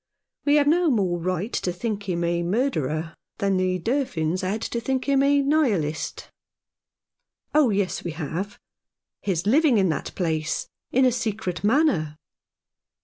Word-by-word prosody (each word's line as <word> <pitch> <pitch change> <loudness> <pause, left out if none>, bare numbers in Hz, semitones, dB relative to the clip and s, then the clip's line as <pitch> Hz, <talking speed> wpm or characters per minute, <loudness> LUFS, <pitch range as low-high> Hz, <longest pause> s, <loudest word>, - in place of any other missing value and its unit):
We 290 0 +4
have 295 -1 +4
no 335 +3 +3
more 190 -9 +1
right 185 +5 -2
to 180 - -1
think 205 +1 -4
him 170 -1 -1
a 170 0 0
murderer 165 - -1 0.2
than 195 -1 +1
the 185 0 +1
Durfins 185 - -1
had 200 +4 -2
to 235 - -3
think 260 +2 -1
him 275 -1 +3
a 280 0 +4
Nihilist." 220 - 0 0.6
" - - -55
Oh 300 -4 +5
yes, 200 -3 -1
we - - -3
have. 170 +6 -4 0.6
His 180 -3 -1
living 270 +2 +4
in 190 -3 +3
that 155 - -3
place 160 -3 -1
— - - -59
in 260 +1 +4
a 255 - +4
secret 220 -6 -3
manner." 205 - +2
200 Hz, 155 wpm, -24 LUFS, 170-260 Hz, 0.6 s, Oh